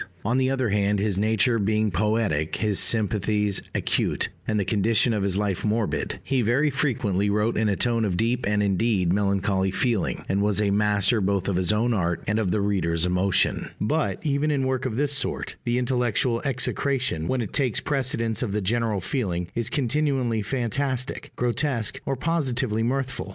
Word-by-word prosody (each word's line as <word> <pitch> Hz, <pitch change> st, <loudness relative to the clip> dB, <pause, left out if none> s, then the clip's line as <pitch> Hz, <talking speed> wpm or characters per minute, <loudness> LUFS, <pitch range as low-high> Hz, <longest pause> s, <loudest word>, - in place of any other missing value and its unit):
On 120 Hz, +5 st, +2 dB
the 130 Hz, 0 st, +2 dB
other 130 Hz, -3 st, 0 dB
hand, 105 Hz, 0 st, +1 dB
his 100 Hz, -1 st, 0 dB
nature 110 Hz, +2 st, +2 dB
being 105 Hz, +1 st, +1 dB
poetic, 100 Hz, -5 st, 0 dB
his 105 Hz, -3 st, 0 dB
sympathies 105 Hz, -2 st, +1 dB
acute, -, -, 0 dB, 0.2 s
and 110 Hz, -1 st, +1 dB
the 100 Hz, -, 0 dB
condition 110 Hz, +3 st, +2 dB
of 105 Hz, -, -1 dB
his 100 Hz, -1 st, -1 dB
life 100 Hz, -3 st, -1 dB
morbid, 110 Hz, 0 st, -1 dB
he 135 Hz, -2 st, 0 dB
very 130 Hz, +7 st, +2 dB
frequently 105 Hz, -8 st, 0 dB
wrote 105 Hz, +3 st, +1 dB
in 110 Hz, 0 st, +1 dB
a 100 Hz, -, +1 dB
tone 115 Hz, +2 st, +1 dB
of 95 Hz, -5 st, 0 dB
deep 115 Hz, +2 st, 0 dB
and 105 Hz, 0 st, +1 dB
indeed 100 Hz, -2 st, +1 dB
melancholy 100 Hz, -1 st, +1 dB
feeling, 115 Hz, +1 st, -1 dB
and 100 Hz, +1 st, 0 dB
was 105 Hz, 0 st, +1 dB
a 105 Hz, -1 st, +2 dB
master 105 Hz, +1 st, +2 dB
both 100 Hz, -1 st, 0 dB
of 100 Hz, -, 0 dB
his 90 Hz, +2 st, +2 dB
own 115 Hz, +3 st, +1 dB
art 85 Hz, -5 st, -1 dB
and 105 Hz, +2 st, 0 dB
of 105 Hz, -4 st, 0 dB
the 105 Hz, +2 st, 0 dB
reader's 85 Hz, -5 st, +1 dB
emotion; 90 Hz, +1 st, +1 dB
but, 150 Hz, +9 st, 0 dB
even 145 Hz, 0 st, 0 dB
in 140 Hz, -3 st, 0 dB
work 130 Hz, 0 st, -1 dB
of 115 Hz, -2 st, -4 dB
this 145 Hz, +1 st, 0 dB
sort, 140 Hz, -, -1 dB
the 120 Hz, 0 st, +1 dB
intellectual 125 Hz, -2 st, 0 dB
execration, 130 Hz, -, -1 dB
when 130 Hz, -, 0 dB
it 105 Hz, -, -8 dB
takes 130 Hz, -6 st, +1 dB
precedence 125 Hz, -5 st, -1 dB
of 110 Hz, -5 st, -2 dB
the 105 Hz, -, 0 dB
general 110 Hz, 0 st, 0 dB
feeling, 90 Hz, -6 st, -2 dB
is 115 Hz, 0 st, -2 dB
continually 135 Hz, -4 st, 0 dB
fantastic, 130 Hz, +3 st, -2 dB
grotesque, 120 Hz, -2 st, -1 dB
or 135 Hz, -, 0 dB
positively 130 Hz, -7 st, -1 dB
mirthful. 130 Hz, +3 st, -2 dB
110 Hz, 180 wpm, -25 LUFS, 100-125 Hz, 0.2 s, On